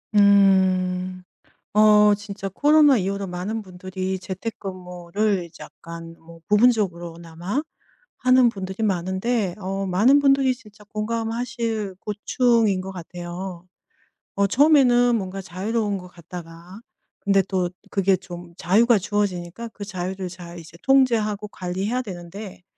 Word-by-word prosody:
음. 185 -2 +3 0.5
어 210 -1 +6
진짜 200 -1 -6
코로나 290 +5 +5
이후로 195 0 -2
많은 195 +5 -4
분들이 185 0 -5
재택근무를 185 0 -3
이제 165 -1 -13
약간 165 0 -10
뭐 165 0 -15
부분적으로나마 180 - +1 0.6
하는 255 -1 +5
분들이 190 0 -5
많은데 190 +1 0
어 195 +1 -3
많은 220 +10 +4
분들이 275 -2 +3
진짜 210 -4 -18
공감하실 225 -1 -3
고충인 215 -1 +1
것 190 +1 -6
같아요. 175 +1 -7 0.7
어 200 0 +2
처음에는 245 -3 +5
뭔가 195 -1 -5
자유로운 205 +3 -2
것 180 - -11
같다가 175 +2 -11 0.4
근데 195 -1 +3
또 185 -2 0 0.2
그게 195 -1 +3
좀 175 -2 -10
자유가 215 +6 +4
주어지니까 200 0 -2
그 205 -2 -9
자유를 185 -1 -4
잘 175 -1 -10
이제 165 0 -13
통제하고 225 -6 +2
관리해야 190 +8 -2
되는데 185 -1 -9
195 Hz, 280 characters per minute, -23 LUFS, 180-220 Hz, 0.7 s, 어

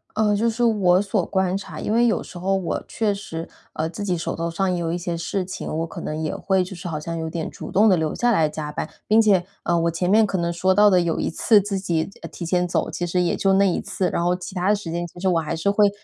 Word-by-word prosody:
呃， 210 -1 +2
就 225 +3 +2
是 230 +2 -1
我 195 -6 +4
所 205 - 0
观 190 -1 0
察 200 - -8
因 215 - -2
为 235 +1 +4
有 230 - +2
时 180 - -10
候 195 +2 0
我 175 -4 -3
确 215 -2 0
实， 165 -4 -6 0.3
呃， 160 - -1
自 175 +5 -6
己 180 -3 0
手 165 - -3
头 165 0 -3
上 190 +3 0
也 - - -1
有 165 -1 -2
一 175 - -1
些 175 -1 -3
事 185 +3 -2
情， 185 +2 -6
我 165 +1 -1
可 - - -8
能 155 - -4
也 155 - -2
会 190 -1 +1
就 185 +1 -8
是 180 +1 -7
好 155 -2 -3
像 165 +2 -5
有 160 0 -3
点 160 -1 -4
主 - - -9
动 210 +3 +4
地 190 - +5
留 160 -2 -1
下 240 0 +1
来 160 -8 +3
加 150 -1 -5
班。 - - -4 0.2
并 220 +1 +5
且， 195 -5 +3 0.2
呃， 170 0 +1
我 170 - +1
前 180 +2 -1
面 220 +2 +5
可 195 -2 -2
能 170 0 0
说 185 +2 +2
到 210 +1 +6
的 185 - +4
有 170 -2 -1
一 - - 0
次 210 +5 +4
自 200 0 -2
己， 170 -2 -1
呃， - - -6
提 170 - -7
前 180 +1 +1
走， - - -1
其 175 - -3
实 180 +1 +1
也 175 - +1
就 195 -1 +2
那 195 +1 +4
1 175 - 0
次， 185 -2 -2
然 170 - -1
后 175 +1 +2
其 180 +1 -8
它 185 +1 0
的 210 - +5
时 200 -5 -6
间 175 +1 -2
其 170 - -19
实 190 +1 +1
我 170 -2 +2
还 160 +1 -3
是 180 +5 +1
会 205 0 +4
180 Hz, 320 characters per minute, -23 LUFS, 170-200 Hz, 0.3 s, 到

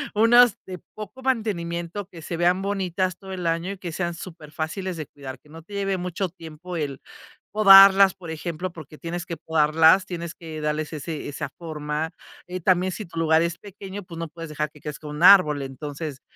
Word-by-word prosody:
unas 230 +1 +6
de 185 -1 -7 0.2
poco 215 +5 -9
mantenimiento, 190 -7 -2
que 165 -4 -12
se 170 - -4
vean 180 +2 +2
bonitas 185 -2 -1
todo 190 -1 -8
el 180 -2 -5
año 165 +3 -1
y - - -11
que 180 -2 -6
sean 175 +1 -3
superfáciles 165 +2 -6
de 155 - -5
cuidar, 135 -2 -9
que - - -25
no 165 +2 -11
te 175 +6 -15
lleve 195 -1 -1
mucho 180 +1 -3
tiempo 165 +1 -9
el 145 -4 -3 0.5
podarlas, 195 -2 +8
por 175 -4 -9
ejemplo, 170 +2 -4
porque 155 -2 -11
tienes 170 +1 -5
que 170 - -5
podarlas, 160 +4 +4
tienes 170 -2 -5
que 160 -2 -8
darles 150 0 -2
ese 155 +1 -5
esa 145 - -5
forma. 155 -1 -3 0.4
Eh 180 0 -5
también, 185 +1 +2
si 210 +3 -6
tu 165 -1 -7
lugar 160 0 +4
es 170 +1 -2
pequeño, 200 0 -9
pues, 170 -2 -10
no 165 - -3
puedes 165 +1 -9
dejar 150 -1 -3
que 150 - -18
crezca 150 +1 -7
un 150 +1 -6
árbol, 180 -7 +7
entonces. 140 +1 -6
170 Hz, 195 wpm, -24 LUFS, 155-190 Hz, 0.5 s, podarlas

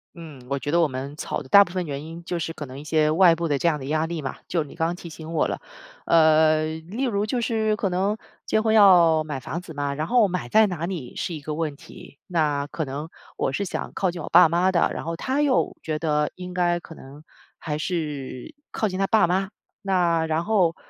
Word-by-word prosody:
嗯， 160 -6 -11
我 140 0 -1
觉 145 - -4
得 170 +1 +3
我 160 - +2
们 135 +2 -6
吵 150 - -4
的 130 - -11
大 200 +9 +8
部 175 - -11
分 180 0 -2
原 140 0 -5
因 165 +2 -9
就 175 - -3
是 165 -1 -3
可 155 -2 -7
能 130 0 -10
一 145 - -8
些 155 0 +2
外 170 +1 +6
部 165 0 -2
的 145 -2 +1
这 170 - +2
样 150 -2 -1
的 130 - -7
压 155 +3 0
力 165 -1 -4
嘛， 135 - -4
就 170 - +1
你 150 - -8
刚 165 0 0
提 175 -1 -9
醒 160 0 -9
我 160 -2 +1
了。 - - -4 0.4
呃， 155 -1 +4 0.2
例 240 +7 -2
如 205 -4 0
就 245 +3 -1
是， 220 -2 0
可 200 - -1
能 190 +4 0 0.3
结 220 - +1
婚 220 0 +2
要 175 -6 +6
买 150 -3 -5
房 165 +7 -5
子 165 -2 -11
嘛， 145 -1 -2
然 155 +3 -3
后 240 -1 +4
买 180 -1 -4
在 220 0 +5
哪 170 -4 -3
里？ 170 -9 -6
是 175 - -3
一 155 - -5
个 150 +1 -5
问 155 -2 -3
题。 180 -3 -14
那 150 -5 0
可 160 - -4
能， 145 +2 -5 0.3
我 135 - -1
是 200 - -1
想 190 - -5
靠 190 -2 0
近 170 -1 -7
我 - - -7
爸 170 -1 +7
妈 175 +3 +2
的， 170 -3 +2
然 - - -6
后， 165 +1 -3
他 265 - -1
又 280 -3 +1
觉 155 -1 -3
得 150 -1 0
应 180 0 -8
该 175 -1 +1
可 165 - -12
能 145 0 -13 0.3
还 150 -2 -4
是， 150 -7 -4 0.2
靠 215 - 0
近 185 0 -4
他 195 - +1
爸 220 -3 +4
妈。 190 +2 0 0.3
那 175 -5 +1
然 160 +1 -1
后， 185 -5 +2
165 Hz, 265 characters per minute, -24 LUFS, 150-185 Hz, 0.4 s, 大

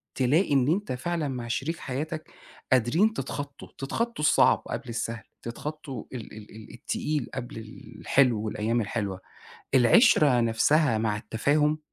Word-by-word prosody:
تلاقي 145 +6 +2
إن 135 -2 +3
أنت 195 +7 0
فعلًا 155 +5 -2
مع 125 -3 -4
شريك 140 +8 -2
حياتك 155 +4 -5 0.4
قادرين 130 - +3
تتخطّوا، 145 -9 -6
تتخطّوا 230 - -2
الصعب - - +5
قبل 130 - -5
السهل، 115 -2 -4 0.2
تتخطّوا 140 +3 -6
ال 120 -4 -7
ال 105 -1 -11
ال 110 -1 -12
التقيل 145 +3 -3
قبل 120 -3 -6 0.4
الحلو 125 -5 +3
والأيام 110 +2 -1
الحلوة. 100 -3 -3 0.6
العِشرة 130 - +5
نفسها 115 +3 +3
مع 110 -1 0
التفاهم 150 +8 +1
130 Hz, 130 wpm, -27 LUFS, 115-150 Hz, 0.6 s, الصعب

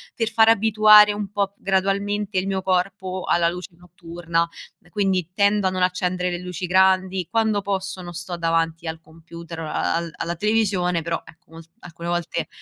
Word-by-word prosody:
per 225 -1 -1
far 220 0 +4
abituare 215 -1 +6
un 205 -1 -4
po' 200 0 -2
gradualmente 195 +1 -1
il 185 - 0
mio 190 -1 -1
corpo 185 0 -2
alla 170 -1 +2
luce 180 +1 -6
notturna, 170 -1 -3 0.4
quindi 190 -4 -1
tendo 200 -1 +3
a - - 0
non 185 0 -3
accendere 180 0 0
le 175 - -2
luci 180 0 -5
grandi, 185 -1 +2
quando 220 -3 +1
posso 190 -1 -3
non 175 -1 -8
sto 175 +2 -6
davanti 165 0 -1
al 160 0 -5
computer 165 +1 -11
o 160 - -5
al - - -2 0.2
al 165 - -9
alla 170 +1 -3
televisione, 195 -5 +1
però 165 +1 -3
ecco 165 +2 -19
molt 165 0 -13
alcune 170 -3 -9
volte, 175 -1 -2
185 Hz, 175 wpm, -22 LUFS, 170-200 Hz, 0.4 s, abituare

